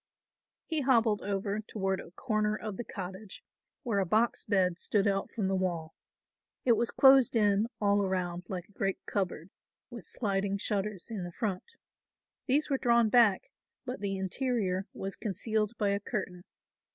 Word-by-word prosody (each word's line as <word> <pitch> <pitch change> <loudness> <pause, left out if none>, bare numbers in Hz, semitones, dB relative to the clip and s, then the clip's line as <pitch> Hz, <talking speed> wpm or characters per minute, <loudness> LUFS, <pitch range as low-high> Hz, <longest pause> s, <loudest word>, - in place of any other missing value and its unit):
He 320 -3 -1
hobbled 230 -5 +3
over 200 +1 -2
toward 195 -3 -2
a - - -9
corner 215 +1 -1
of 215 -2 -5
the 240 - -4
cottage, 190 0 -8 0.4
where 225 -6 0
a 195 - +1
box 220 +6 +2
bed 185 -4 +1
stood 205 -2 +1
out 195 -1 0
from 205 -4 -1
the 195 - 0
wall. 175 -4 -2 0.7
It 250 - +5
was 235 +1 +3
closed 265 -3 +6
in 210 0 +3
all 205 -1 +3
around 180 -2 -2
like 185 -2 -5
a - - -24
great 195 -2 -1
cupboard, 190 -3 -3 0.4
with 235 -5 -9
sliding 200 -2 -1
shutters 200 0 -2
in 205 -5 -3
the 175 - -6
front. 205 - -4 0.7
These 290 +3 +2
were 275 -2 0
drawn 235 -3 +4
back, 220 -5 +4 0.3
but 250 +2 -4
the 195 -1 -2
interior 190 -1 -1
was 195 0 -5
concealed 215 +2 -2
by 205 -2 +1
a 200 0 +1
curtain. 185 -4 -5
205 Hz, 165 wpm, -30 LUFS, 190-225 Hz, 0.7 s, closed